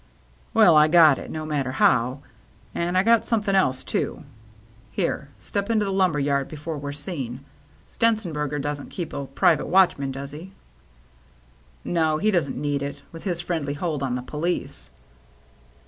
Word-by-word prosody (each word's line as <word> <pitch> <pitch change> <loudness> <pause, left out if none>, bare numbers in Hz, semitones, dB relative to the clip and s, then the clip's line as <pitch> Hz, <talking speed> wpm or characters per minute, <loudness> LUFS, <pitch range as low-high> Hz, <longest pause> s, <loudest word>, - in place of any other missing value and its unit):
" - - -32
Well, 215 -7 +7
I 150 0 +7
got 155 -4 +6
it. - - -8
No 155 0 -5
matter 140 -4 -2
how. 130 +1 +2 0.5
And 175 +2 -1
I 185 - +4
got 230 +1 +4
something 210 -4 0
else, 130 -10 +2
too. - - -3 0.7
Here, - - -2
step 200 +1 -4
into 215 -2 +2
the 195 - -2
lumber 185 -5 +2
yard 140 -1 0
before 155 +1 -6
we're 140 0 -5
seen. 140 -4 -6 0.4
Stenzenber 185 -11 0
ger 150 - -3
doesn't 145 0 -4
keep 175 -3 -6
a 140 -1 -4
private 145 +3 +2
watchman, 175 -7 +3
does 135 +1 -6
he?" 170 +6 -10 0.7
" - - -32
No. 160 -3 +1
He 215 +6 +2
doesn't 170 -8 0
need 145 0 -1
it, 140 0 -5
with 165 +3 -11
his 175 -3 -1
friendly 160 -5 -2
hold 155 -2 -2
on 130 -3 -1
the 125 - -4
police." 160 +6 -3
150 Hz, 170 wpm, -24 LUFS, 140-175 Hz, 0.7 s, Well